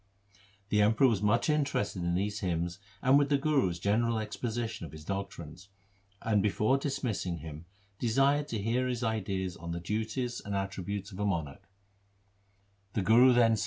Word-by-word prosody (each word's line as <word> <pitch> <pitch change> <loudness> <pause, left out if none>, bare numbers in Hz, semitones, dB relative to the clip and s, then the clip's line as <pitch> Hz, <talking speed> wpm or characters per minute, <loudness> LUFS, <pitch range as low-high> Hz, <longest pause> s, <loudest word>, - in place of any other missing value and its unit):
4 100 - -28 0.3
The 105 0 +3
Emperor 110 +5 +5
was 110 -6 +1
much 105 +3 +2
interested 140 - 0
in 85 0 0
these 100 +2 -1
hymns 85 0 -2 0.2
and 135 +2 +6
with 140 -1 +1
the 145 - +4
Guru's 135 - +1
general 110 +5 +1
exposition 110 0 -3
of 80 - -8
his 75 -1 -10
doctrines, 95 -2 -6 0.5
and 105 -3 +2
before 105 +6 +2
dismissing 115 - -2
him 80 0 -9 0.3
desired 135 +5 +2
to 115 -6 -3
hear 120 +5 0
his 125 -1 -2
ideas 95 -5 -2
on 85 0 -6
the 85 - -3
duties 110 +6 -2
and 100 -1 -4
attributes 100 +1 -3
of 95 - -9
1 105 - +1
Wadhans. 80 -6 -4
105 Hz, 155 wpm, -30 LUFS, 95-120 Hz, 0.5 s, and